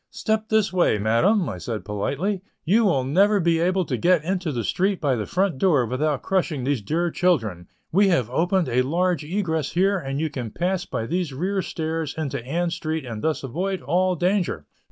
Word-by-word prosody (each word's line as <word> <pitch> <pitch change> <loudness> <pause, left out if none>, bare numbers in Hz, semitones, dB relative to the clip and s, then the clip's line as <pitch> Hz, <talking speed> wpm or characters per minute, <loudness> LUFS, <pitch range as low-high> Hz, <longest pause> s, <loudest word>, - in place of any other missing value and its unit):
"Step 220 0 -2
this 220 -3 +2
way, 175 -11 +3
madam," 145 - +2
said 110 +2 -4
I - - -26
politely, 140 - -2 0.2
"you 215 +7 +4
will 140 -10 +2
never 200 +10 +3
be 170 -2 +2
able 185 +2 +1
to - - -2
get 175 -3 +3
into 180 -1 -1
the 120 -4 -2
street 190 - 0
by 140 -4 +1
the 105 -3 -3
front 185 -6 0
door 150 -10 +3
without 130 +3 -1
crushing 175 -8 0
these 135 -3 0
dear 170 +9 -1
children. 110 - 0 0.2
We 195 +4 +4
have 150 - +2
opened 175 +5 +1
a 125 +2 +2
large 170 +4 0
egress 160 -3 -2
here 195 +2 +2
and 135 -3 -4
you 160 -1 -1
can 125 -6 -4
pass 180 - -1
by 110 - -3
these 170 +1 -2
rear 190 +8 -1
stairs 160 -3 -3
into 140 -6 -3
Ann 170 +7 -1
Street 155 -3 -3
and 110 -3 -6
thus 160 -2 -1
avoid 180 +8 -3
all 180 +6 +1
danger." 175 - 0
165 Hz, 195 wpm, -23 LUFS, 135-185 Hz, 0.2 s, you